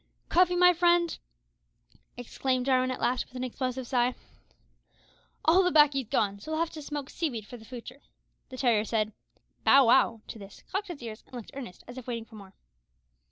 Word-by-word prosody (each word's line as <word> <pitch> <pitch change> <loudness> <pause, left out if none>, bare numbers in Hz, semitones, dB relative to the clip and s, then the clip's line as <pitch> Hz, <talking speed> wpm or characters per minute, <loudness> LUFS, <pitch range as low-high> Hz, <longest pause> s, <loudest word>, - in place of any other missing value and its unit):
"Cuffy, 360 0 +4
my 360 0 +6
friend," 345 0 +2 1.0
exclaimed 250 +1 -2
Jarwin 255 -1 +2
at 255 - -3
last, 250 0 0
with - - -21
an 250 - -3
explosive 255 0 -3
sigh, 245 0 +1 1.3
"all 340 +4 +6
the 360 - +3
baccy's 290 -6 +4
gone, 200 -3 0
so 210 - -10
we'll 315 0 -1
have 330 0 0
to 310 - -8
smoke 290 -1 -5
sea 330 +2 -2
weed 225 -5 -6
for 245 - -10
the 225 -2 -13
futur'." 250 +3 -10 0.5
The 260 - -9
terrier 235 -5 +3
said 220 -1 -1 0.5
"Bow 275 -1 +7
wow" 230 -2 +4
to 225 - -8
this, 195 -1 -12
cocked 395 +1 -2
its 300 -8 -7
ears, 220 -1 -8
and - - -13
looked 235 -4 -8
earnest, 255 -10 -9
as 245 +1 -8
if 255 - -13
waiting 230 -2 -4
for 225 - -21
more. 200 -3 -12
255 Hz, 195 wpm, -28 LUFS, 230-300 Hz, 1.3 s, Bow